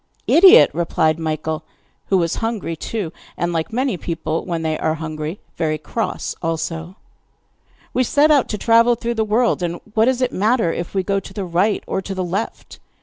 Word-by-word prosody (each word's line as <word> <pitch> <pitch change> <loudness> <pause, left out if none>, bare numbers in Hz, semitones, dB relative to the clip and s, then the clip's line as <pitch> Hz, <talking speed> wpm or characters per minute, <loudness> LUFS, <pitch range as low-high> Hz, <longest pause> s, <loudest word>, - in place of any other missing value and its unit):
'Idiot!' 390 +7 +7
replied 165 -2 +1
Michael, 155 0 -3 0.4
who 195 - +3
was 170 -2 0
hungry 225 -7 -2
too, 185 0 -4 0.2
and, 175 0 -1
like 165 +5 -2
many 250 -3 0
people 165 -1 -3
when 170 -2 -3
they 160 -1 0
are 160 - 0
hungry, 155 +2 -5 0.2
very 155 -2 0
cross 220 +9 -3
also. 165 +1 -3 1.0
'We 255 - +2
set 295 +5 +4
out 285 -4 +3
to 210 - -2
travel 230 +2 +4
through 235 +1 -3
the 220 -1 0
world, 220 0 +1
and 175 0 -2
what 220 0 +4
does 255 0 +1
it 250 - -1
matter 215 -3 +2
if 170 +3 -5
we 190 - +1
go 195 +1 0
to - - -12
the 200 -3 -3
right 185 +5 +1
or - - -2
to 195 0 -6
the 185 - -2
left? 190 +5 -4
185 Hz, 190 wpm, -20 LUFS, 165-230 Hz, 1.0 s, Idiot